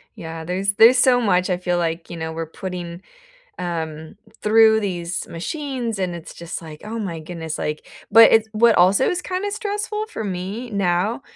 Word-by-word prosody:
Yeah, 160 0 -7
there's 190 +3 0
there's 230 +5 +7
so 245 0 +4
much 185 -4 +2
I 180 - +1
feel 180 -1 -1
like, 165 -1 -2
you 170 - -7
know, 160 0 -4
we're 165 0 -4
putting, 175 0 -7 0.6
um, 160 -1 -5 0.3
through 220 0 +5
these 180 -3 -3
machines, 245 - -4
and 185 -2 -2
it's 170 -2 -9
just 170 0 -7
like, 155 -2 -11
"Oh 225 +2 -5
my 175 -6 -4
goodness," 160 -1 -6
like 150 0 -4 0.3
but 230 0 +9
it 225 -1 +5
what 225 +1 +4
also 190 +8 +4
is 360 0 -1
kinda 380 +2 -3
stressful 420 0 -3
for 335 - -6
me 200 +6 -5
now 200 +4 0
185 Hz, 180 wpm, -21 LUFS, 170-230 Hz, 0.6 s, but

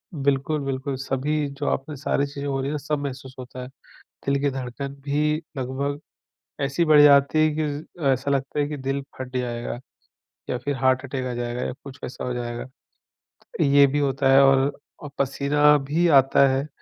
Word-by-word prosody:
बिल्कुल, 140 +1 0
बिल्कुल। 135 +1 -3
सभी 140 +3 -1
जो 145 - -2
आपने 145 +3 -3
सारी 140 0 0
चीज़ें 140 0 -6
हो 135 -1 -1
रही 135 - -2
हैं - - -3
ना - - -1
सब 150 0 -2
महसूस 130 -1 -6
होता 125 0 -8
है। - - -8 0.6
दिल 140 0 +2
की 140 0 +1
धड़कन 135 +1 -5
भी 150 +1 +1 0.2
लगभग 140 +2 -3 0.6
ऐसी 140 +5 +1
बढ़ 155 -2 +7
जाती 140 +1 +6
है - - +3
कि, 155 0 0 0.3
ज़ - - -6
ऐसा 135 +2 0
लगता 135 +1 -1
है 145 - +1
कि 150 0 -5
दिल 135 +1 -2 0.2
फट 130 0 -7
जाएगा 120 -1 -3 0.7
या - - 0
फिर 140 +4 -3
हार्ट 130 0 +2
अटैक 130 -1 -4
आ 125 - -3
जाएगा 120 0 -3
या - - -3
कुछ 140 0 -10
वैसा 125 - -6
हो 125 - -2
जाएगा। 120 -1 -4 1.0
ये 140 0 +6
भी 145 +2 0
होता 135 -1 +1
है 135 - +8
और 135 0 +4 0.3
औ 150 - -8
पसीना 145 +2 +3
भी 150 +5 0
आता 135 -2 +5
है, 135 +2 -1
140 Hz, 195 wpm, -24 LUFS, 130-145 Hz, 1.0 s, है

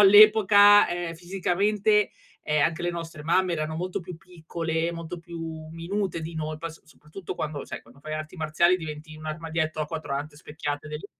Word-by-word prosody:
all'epoca, 205 0 +8
ehm, 175 -1 -3
fisicamente, 195 +4 +1 0.3
ehm, 150 -1 +2
anche 165 +3 +1
le 175 - 0
nostre 165 -2 -6
mamme 175 +3 +2
erano 155 0 -3
molto 180 +4 -3
più 180 -1 -9
piccole, 165 -1 -3
molto 170 +1 -6
più 170 0 -9 0.3
minute 175 +2 -2
di 165 +1 -6
noi, 155 -1 -3
poi 165 +1 -5
s 165 - -17
soprattutto 155 +4 -9
quando 150 -2 -4
sai, - - -7
quando 120 +4 -20
fai 155 +1 -7
arti 155 +2 -5
marziali 165 +3 +3
diventi 155 -2 -8
un 155 - -11
armadietto 155 0 -2
a 155 - -1
4 150 -2 -5
ante 145 +2 -4
specchiate 150 -1 -5
dell'I 150 +5 -6
165 Hz, 180 wpm, -26 LUFS, 155-180 Hz, 0.3 s, all'epoca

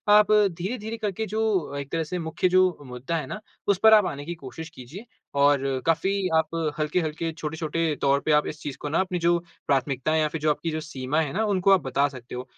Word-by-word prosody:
आप 210 0 +5
धीरे-धीरे 210 +3 +1
करके 215 0 -2
जो 210 -8 -1
एक 140 0 -6
तरह 165 -1 0
से 180 +3 -4
मुख्य 160 +3 0
जो 185 -1 +3
मुद्दा 125 +6 -4
है 155 - -4
ना, 215 - -5 0.3
उस 200 - +3
पर 220 0 +8
आप 210 -3 +7
आने 145 -4 -4
की 170 +2 -4
कोशिश 160 +3 -9
कीजिए। 160 - -10 0.3
और 140 0 +4 0.3
काफ़ी 165 +4 +2 0.3
आप 160 - +1 0.3
हल्के-हल्के, 160 +1 -1
छोटे-छोटे 160 -1 -2
तौर 140 0 +3
पे 155 - +2
आप 150 0 +3
इस 150 - -6
चीज़ 145 -3 -5
को 150 - -3
ना 155 - +1
अपनी 185 -2 -1
जो 170 +1 +3 0.3
प्राथमिकताएँ 140 +3 +1
या 155 - +2
फिर 155 -1 -5
जो 155 - +2
आपकी 160 +2 -1
जो 155 - -2
सीमा 145 -1 -2
हैं 150 -1 -3
ना, 220 +3 0
उनको 195 -1 +2
आप 190 - +4
बता 140 +2 +1
सकते 125 -3 -9
हो। 125 - -4
160 Hz, 225 wpm, -25 LUFS, 145-185 Hz, 0.3 s, पर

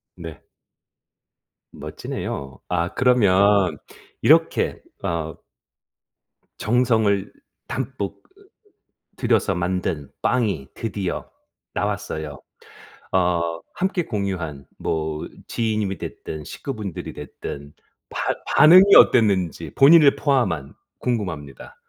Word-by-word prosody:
네. 80 -3 -9 1.3
멋지네요. 65 -2 -6
아, 90 0 -1
그러면 100 -6 +3 0.4
이렇게 - - +3 0.2
어 85 -4 -2 1.2
정성을 110 -4 +1 0.4
담뿍 130 -6 -4 1.0
들여서 95 - +2
만든 90 -4 -2
빵이 100 - 0
드디어 100 -5 -4 0.4
나왔어요. 100 -8 -3 0.7
어 85 -2 +1
함께 185 -2 -1
공유한 90 - -4
뭐 80 -1 -3 0.2
지인님이 110 -4 -1
됐든 75 -1 -7
식구분들이 105 - -6
됐든 70 0 -8 0.4
반 - - -2 0.2
반응이 185 +7 +8
어땠는지 95 - +4
본인을 145 0 +7
포함한 120 - 0 0.3
궁금합니다. 90 - -4
95 Hz, 195 characters per minute, -22 LUFS, 80-115 Hz, 1.3 s, 반응이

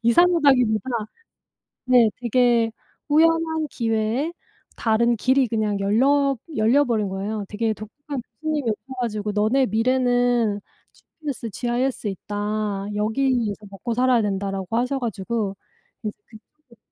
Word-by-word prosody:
이상하다기보다 260 - +4 1.0
네 245 -3 +6
되게 240 -1 +3 0.4
우연한 320 +1 +3
기회에 230 +7 -1 0.4
다른 235 +1 +2
길이 260 +3 +3
그냥 215 -2 0
열려 275 +7 +3 0.2
열려버린 225 -2 +2
거예요. 200 +2 -3
되게 220 +1 -1
독특한 270 +6 -7 0.2
교수님이 300 -7 0
오셔 260 +5 -6
가지고 215 -3 -2
"너네 220 +6 +2
미래는 245 -1 +2 0.3
GPS, 280 -7 -7
GIS에 240 +1 -1
있다. 205 0 -3
여기에서 220 -1 0
먹고살아야 240 +3 +1
된다."라고 195 -1 -2
하셔가지고 230 -5 -2 0.5
이제 210 - -2 0.2
그쪽으로 235 +3 -19
235 Hz, 295 characters per minute, -23 LUFS, 210-260 Hz, 1.0 s, 네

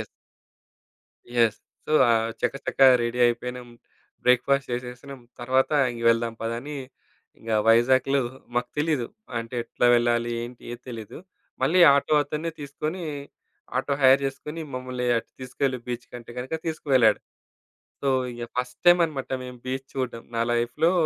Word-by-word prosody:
Yes. - - -5 1.3
Yes! 115 -3 +3 0.3
So, - - -3 0.2
ఆహ్, 115 -1 +2
చకచక 140 - -3 0.2
ready 120 +1 -2
అయిపోయినాం. 125 +1 -3 0.6
బ్రేక్‌ఫాస్ట్ 140 +2 +3
చేసేసినాం. 125 +2 -6 0.2
తర్వాత 130 +2 +2 0.2
ఇంగ 115 -1 -7
వెళ్దాం 115 0 0
పద 115 0 -2
అని, 145 +3 -7 0.6
ఇంగ 115 - -8 0.2
వైజాగ్‌లో 130 +4 +4 0.3
మాకు 120 0 -1
తెలీదు. 150 -6 +1 0.3
అంటే 115 +2 -7
ఎట్లా 125 - 0
వెళ్ళాలి? 120 0 +2
ఏంటి? 120 +1 -9
ఏది 120 +1 -9
తెలీదు. 115 -4 -8 0.4
మళ్ళీ 180 +3 +3
ఆటో 140 +2 +2
అతన్నే 150 +3 -3
తీసుకొని, 150 +5 -4 0.8
ఆటో 140 - 0
హైర్ 135 +1 +7
చేసుకొని, 150 +4 -6
మమ్మల్ని 125 -1 -4
అటు 115 - -10
తీసుకెళ్లి 130 0 -2
బీచ్‌కంటే 120 -1 -7
గనక 130 +6 -4
తీసుకు 160 -2 -4
వెళ్ళాడు. 110 -5 +5 0.8
సో, 140 - -1 0.3
ఇగ 120 0 -6
ఫస్ట్ 125 0 -3
టైమన్నమాట. 165 -6 +4
మేము 125 0 -9
బీచ్ 130 +1 -3
చూడడం. 125 -3 -3
నా 115 - +1
లైఫ్‌లో 120 +8 +1
125 Hz, 135 wpm, -25 LUFS, 120-140 Hz, 1.3 s, హైర్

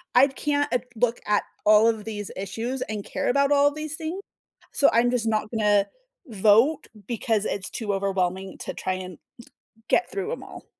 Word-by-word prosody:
I 260 +3 +7
can't 290 +1 -1
at 245 0 0
look 235 +1 +1
at 210 0 +2 0.2
all 215 +1 +6
of 220 -2 -3
these 205 -2 -5
issues 225 +7 -4
and 210 -1 -5
care - - -3
about 280 +2 +2
all 285 0 +4
these 305 0 -5
things, 330 +5 -4 0.5
so 280 - +4
I'm 240 +1 +3
just 235 -2 0
not 215 -1 0
gonna 210 -3 +2 0.4
vote 225 +7 +3 0.2
because 225 -2 0
it's 190 -2 -3
too 210 -3 -3
overwhelming 190 -1 -1
to - - -5
try 185 - -2
and 185 -2 -7 0.7
get 360 - +2
through 400 +3 -3
‘em - - -5
all. - - -11
225 Hz, 180 wpm, -25 LUFS, 205-275 Hz, 0.7 s, I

